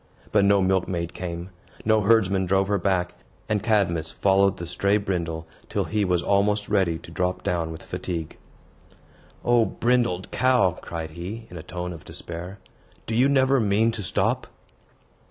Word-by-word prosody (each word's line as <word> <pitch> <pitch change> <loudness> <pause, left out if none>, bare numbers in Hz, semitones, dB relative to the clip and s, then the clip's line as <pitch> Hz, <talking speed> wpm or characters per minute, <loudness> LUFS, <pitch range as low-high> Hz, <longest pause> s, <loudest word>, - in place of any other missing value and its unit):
But 100 -2 +4
no 100 -1 +4
milkmaid 90 -2 0
came; 85 +1 -5 0.3
no 110 0 +4
herdsman 100 -3 +3
drove 95 +1 +2
her 100 -1 +2
back; 90 -1 0 0.3
and 105 -1 0
Cadmus 95 -8 +1
followed 100 0 +2
the 85 - -5
stray 100 +4 +1
Brindle 85 -5 -3 0.2
till - - 0
he 105 -1 0
was 90 -2 +1
almost 105 +1 +2
ready 95 -5 +2
to 80 - -13
drop 90 +1 -1
down 85 -2 -1
with 80 - -9
fatigue. 85 -4 -5 1.1
"O 120 -1 +5
brindled 120 -6 0
cow," 125 -7 +3
cried 80 -2 -5
he, 95 +8 -7
in 90 - -8
a - - -6
tone 90 +1 -5
of 80 - -11
despair, 85 +3 -7 0.5
"do 115 - -4
you 125 +5 +4
never 135 -1 +4
mean 110 +1 +2
to 110 -2 -5
stop?" 90 - 0
95 Hz, 160 wpm, -25 LUFS, 85-105 Hz, 1.1 s, O